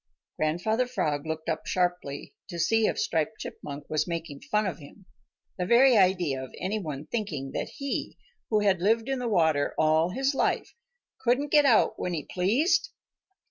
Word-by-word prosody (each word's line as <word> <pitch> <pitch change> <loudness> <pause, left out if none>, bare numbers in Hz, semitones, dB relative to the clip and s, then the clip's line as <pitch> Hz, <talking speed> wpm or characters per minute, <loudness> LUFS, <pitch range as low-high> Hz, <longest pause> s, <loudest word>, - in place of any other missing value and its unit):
Grandfather 215 +11 0
Frog 150 - -2
looked 160 0 -4
up 160 -1 -2
sharply 175 -6 -2
to 175 - -7
see 220 +6 +3
if - - -1
Striped 165 +2 -1
Chipmunk 145 0 -8
was 155 -1 0
making 165 -4 -5
fun 210 +9 0
of 175 -5 -3
him. 160 +6 -14 0.5
The 180 - -1
very 250 +3 +6
idea 180 -9 +2
of 130 - -9
any 200 +4 -1
one 150 -5 -5
thinking 155 - -4
that - - -3
he, 275 -1 -4 0.3
who 215 -2 +2
had 195 -4 +2
lived 225 +4 +2
in 270 -1 -1
the 245 -1 -2
water 160 -7 +2
all 155 +2 +3
his 270 +8 0
life, - - 0 0.5
couldn't 260 +4 +1
get 295 -1 +6
out 235 -6 +4
when 180 -1 -2
he 150 - -3
pleased! 250 - +1
180 Hz, 175 wpm, -27 LUFS, 155-225 Hz, 0.5 s, very